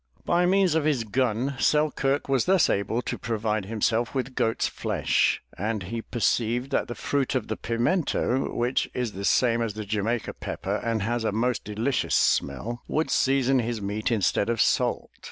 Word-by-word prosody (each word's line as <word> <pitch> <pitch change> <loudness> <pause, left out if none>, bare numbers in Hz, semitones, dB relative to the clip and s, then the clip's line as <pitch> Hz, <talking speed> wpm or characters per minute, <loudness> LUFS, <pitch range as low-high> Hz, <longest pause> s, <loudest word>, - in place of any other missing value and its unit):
By 175 +1 +3
means 190 -2 +3
of 160 -1 +1
his 145 -6 +1
gun, 125 +3 0
Selkirk 145 -2 +1
was 135 -3 +2
thus 185 -2 +4
able 100 +5 -1
to - - -4
provide 110 -2 -1
himself 115 +3 0
with 130 0 -2
goat's 115 -2 0
flesh, - - 0
and 105 -1 -2
he 115 +6 -4
perceived 120 +3 0
that - - 0
the 120 - -5
fruit 140 -2 -1
of 125 -5 -2
the 110 - -1
pimento 125 - 0
which 120 +2 0
is 125 -3 -1
the 100 0 -5
same 120 0 +3
as 110 -3 -2
the 110 -1 -5
Jamaica 110 +3 -1
pepper - - -4
and 115 -3 -1
has 120 +2 -1
a 110 - 0
most 120 +3 0
delicious 115 +6 -1
smell, 120 +2 0
would 155 -3 -1
season 135 0 +3
his 115 -1 -2
meat 105 +3 -2
instead 105 -1 +1
of 115 -1 0
salt. - - +1
120 Hz, 175 wpm, -26 LUFS, 110-135 Hz, -, thus